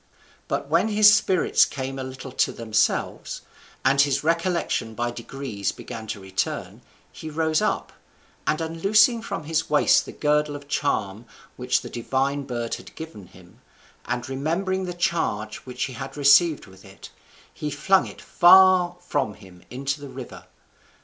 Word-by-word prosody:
But - - -2
when - - +2
his 210 -1 +6
spirits 190 -4 +3
came 135 -1 -4
a - - -3
little 130 0 -8
to - - +1
themselves, 110 -2 -1 0.4
and 140 +1 +5
his 140 0 +1
recollection 165 -8 -1
by 120 +1 -2
degrees 120 -4 -4
began 110 -1 -9
to 105 - -5
return, 95 0 -4 0.3
he 160 - -8
rose 160 0 0
up, - - -1 0.5
and 155 +2 +1
unloosing 205 +8 +3
from 165 - -5
his 160 +1 -1
waist 150 0 +4
the - - -7
girdle 150 0 0
or - - -12
charm 115 -7 -2 0.3
which - - 0
that - - -10
divine 135 +4 -1
bird 120 -2 -4
had - - -15
given 160 - -9
him, 90 +8 -19 0.4
and 120 0 -3
remembering 170 +8 -2
the 180 -1 -5
charge 110 -11 -1
which 125 0 -4
he 130 - -4
had 135 +4 -7
received 145 +3 +5
with 95 0 -17
it, 95 0 -13 0.4
he 150 - -4
flung 190 +7 +2
it - - -11
far 180 0 +6
from 110 -11 -2
him 95 -4 -16
into 140 +3 -3
the 140 - -8
river. 130 -1 -10
140 Hz, 155 wpm, -24 LUFS, 120-165 Hz, 0.5 s, his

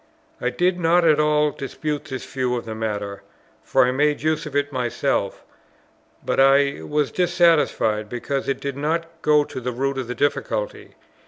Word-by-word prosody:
I - - +1
did 180 0 0
not 170 +1 +3
at 155 -2 +4
all 150 0 +3
dispute 145 +2 -4
this 130 -1 -6
view 130 -2 -2
of 120 - -4
the 110 - -5
matter, 105 -2 -4 0.4
for - - +3
I 125 - +1
made 145 +3 +1
use 155 -1 0
of 145 - -9
it 145 0 0
myself; 125 -4 -1 0.8
but - - 0
I 140 +1 +4
was 150 -2 -1
dissatisfied, 165 - +2
because 135 +3 -3
it 135 - -1
did 140 -1 -4
not 160 +3 -1 0.2
go 150 -1 +4
to 130 - -7
the 125 +1 -2
root 135 +2 -2
of 130 - -4
the 125 - -4
difficulty. - - -2
140 Hz, 175 wpm, -22 LUFS, 125-150 Hz, 0.8 s, at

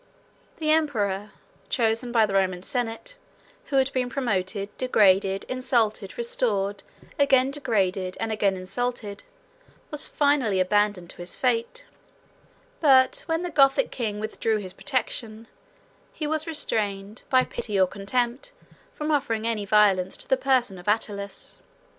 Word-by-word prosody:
The 310 -2 0
emperor, 210 -11 0 0.4
chosen 230 0 0
by 225 -2 +4
the 200 - -5
Roman 185 -2 +1
senate, 245 - -4 0.5
who 285 - -4
had 270 0 +2
been 250 -1 -1
promoted, 205 -6 -2
degraded, 195 -5 +3
insulted, 230 -6 0
restored, 205 -4 -1 0.4
again 270 -2 +4
degraded, 195 -9 -1
and 225 0 -2
again 200 -3 +1
insulted, 205 +2 -3 0.7
was 300 -1 +4
finally 280 -9 +1
abandoned 200 -1 +1
to - - -16
his 175 0 -2
fate; 250 - -1 0.9
but 260 -4 +5
when 325 +1 -1
the 355 - -4
Gothic 275 - +4
king 215 -4 -3
withdrew 220 +1 -1
his 190 -3 -7
protection, 230 -4 -3 0.7
he 310 - -5
was 315 +1 -1
restrained, 210 -8 -3
by 255 -1 +4
pity 205 -3 -3
or 190 - +6
contempt, 240 - -2 0.4
from 305 0 -2
offering 265 -7 0
any 220 -3 -1
violence 195 -3 +3
to - - -5
the 265 - +3
person 255 -7 +1
of 175 - -14
Attalus. 205 -2 -2
225 Hz, 135 wpm, -25 LUFS, 200-265 Hz, 0.9 s, or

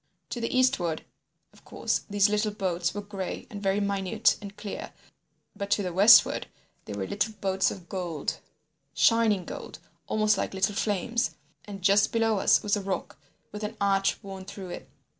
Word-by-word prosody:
"To 240 - -3
the 230 - -1
eastward, 185 -12 +1 0.5
of - - -21
course, - - -2
these 205 0 +4
little 210 +1 +1
boats 185 -3 -2
were 205 - -4
gray 200 -2 -5
and 205 -2 -7
very 195 0 +1
minute 200 +2 +1
and 200 0 -9
clear, 205 -2 -6 0.6
but 200 -1 -5
to 205 - +2
the 180 -2 -3
westward 200 +6 +6 0.4
they - - -6
were 100 -1 -3
little 210 - -1
boats 190 -1 +1
of 180 -3 -9
gold—shining 175 +4 -1
gold—almost 215 -2 -2
like - - -3
little 195 +2 +1
flames. 225 +4 -1 0.3
And 195 -3 -9
just 200 +2 +4
below 225 -2 +2
us - - +4
was 205 0 +2
a 205 - -2
rock 195 -1 -4 0.3
with 210 +1 -7
an 215 +1 -4
arch 195 -1 +2
worn 195 -1 -8
through 190 -1 -8
it. - - -8
200 Hz, 165 wpm, -27 LUFS, 190-210 Hz, 0.6 s, westward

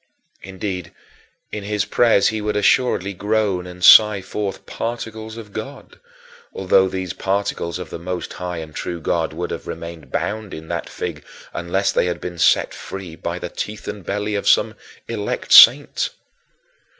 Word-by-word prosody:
Indeed, 95 -2 -5 0.6
in 105 - -5
his 105 0 -1
prayers 115 -4 +3
he 110 -1 -3
would 105 0 -2
assuredly 105 -2 +2
groan 100 -2 0
and 90 0 -3
sigh 105 -3 +8
forth 100 -1 -4
particles 110 -1 -5
of 105 -3 -10
God, - - -8 0.5
although 95 0 +3
these 95 -1 -4
particles 95 -4 -2
of 90 -2 -8
the - - -6
most 90 +1 -5
high 90 -1 -5
and 80 -1 -7
true 85 +2 -4
God 80 0 -1
would 85 +3 -5
have - - -6
remained 85 -2 -8
bound 105 -2 -3
in 80 0 -10
that - - -3
fig - - -5 0.3
unless 90 +3 0
they - - +1
had 85 -1 -2
been 90 -1 -7
set - - +3
free 95 -4 -8
by - - -4
the - - -5
teeth 105 0 -6
and 105 -2 -6
belly 105 +2 -2
of 100 - 0
some - - +4 0.3
"elect 105 -3 -4
saint"! 145 - +8
95 Hz, 160 wpm, -21 LUFS, 90-105 Hz, 0.6 s, sigh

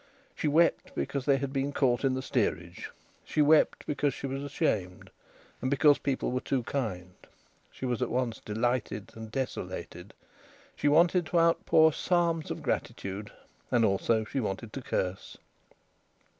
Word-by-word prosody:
She - - -2
wept 165 +3 +2
because 140 -2 -2
they 140 -2 +4
had 135 0 -4
been 135 +1 -1
caught 130 -3 +1
in 135 -1 +2
the 130 - -3
steerage. 90 -9 -2 0.3
She - - -4
wept 155 +1 +4
because 145 -2 0
she - - -6
was 135 0 -3
ashamed, 110 - -2 0.5
and 130 - 0
because 145 +1 +5
people 135 -3 -1
were 125 - 0
too 130 -3 -1
kind. 95 -9 -3 0.6
She - - -7
was 125 -2 -1
at - - 0
once 120 -2 -1
delighted 110 -1 -2
and 110 0 -8
desolated. 110 -7 -5 0.6
She - - 0
wanted 170 +3 +4
to 175 - +2
outpour 160 -1 +4
psalms 170 -2 0
of - - -5
gratitude, 100 +2 -3 0.4
and 120 -2 +3
also 110 +2 +1
she 135 - -3
wanted 105 0 -4
to 135 - -5
curse. 95 -5 -3
130 Hz, 155 wpm, -29 LUFS, 110-145 Hz, 0.6 s, because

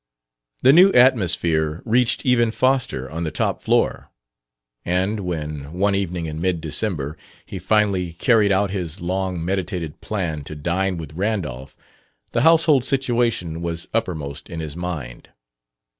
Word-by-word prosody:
The 130 - +7
new 185 +5 +7
atmosphere 85 - +3
reached 120 +1 +2
even 120 -3 +3
Foster 125 - 0
on 80 +4 -5
the 80 - -1
top - - -1
floor; - - 0 0.7
and 95 +5 0
when, 75 -6 -5
one 100 +3 +1
evening 90 -3 -2
in 80 0 -5
mid 90 -2 0
December, 80 -2 -2 0.3
he 95 - -7
finally 95 -2 +1
carried 105 +3 +3
out 100 0 +2
his 90 -6 -4
long 90 -1 -2
meditated 90 -4 -3
plan 85 -8 -3
to 75 - -7
dine 90 +5 -1
with 80 -2 -8
Randolph, 80 - -3 0.5
the 115 - +1
household 160 -3 +5
situation 120 - 0
was 85 -1 -4
uppermost 80 -9 -3
in 85 -2 -6
his 80 -2 -6
mind. 80 -9 -6
90 Hz, 140 wpm, -22 LUFS, 80-110 Hz, 0.7 s, The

